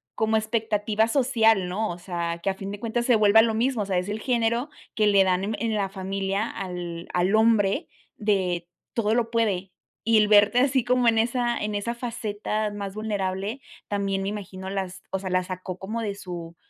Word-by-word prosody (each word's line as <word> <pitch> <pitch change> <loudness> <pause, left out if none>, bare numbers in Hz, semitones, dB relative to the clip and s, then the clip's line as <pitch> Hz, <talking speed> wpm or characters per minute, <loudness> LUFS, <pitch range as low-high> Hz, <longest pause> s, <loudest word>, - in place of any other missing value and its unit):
como 220 0 +1
expectativa 220 -1 +1
social, 225 -7 +3
¿no? 215 +4 -1
O 175 - -6
sea, 170 -2 -3
que 195 - +1
a 190 - +1
fin 195 +1 -6
de 205 - -6
cuentas 235 +1 -1
se 245 - +5
vuelva 215 0 +6
lo 225 -1 +2
mismo. 235 0 +1
O - - -5
sea, 190 -2 0
es 180 +2 -2
el 210 +1 -3
género 235 +2 0 0.2
que 215 -1 +2
le 200 -1 +5
dan 185 0 +1
en 215 +2 -2
en 225 -1 -1
la 200 -2 0
familia, 195 +2 -2
al 175 -3 -6
al 180 +4 +2
hombre, 220 - +3 0.3
de 185 -5 0 0.3
todo 220 -2 +1
lo 235 -1 +1
puede, 200 -5 0 0.3
y 225 -1 +4
el 210 - +5
verte 210 +3 +5
así 260 -1 +3
como 250 0 +2
en 225 -1 +4
esa 240 +1 +1
en 210 0 -3
esa 205 +3 -2
faceta 215 -3 -3
más 200 -1 -5
vulnerable 205 +2 -2 0.3
también 195 -1 -1
me 195 - -1
imagino 190 -2 -6
las 190 -1 -4
o 190 - -1
sea, 190 0 -5
las 185 0 0
sacó 185 0 -5
como 215 +5 -4
de 205 -3 -3
su 175 -4 -7
205 Hz, 205 wpm, -25 LUFS, 190-225 Hz, 0.3 s, vuelva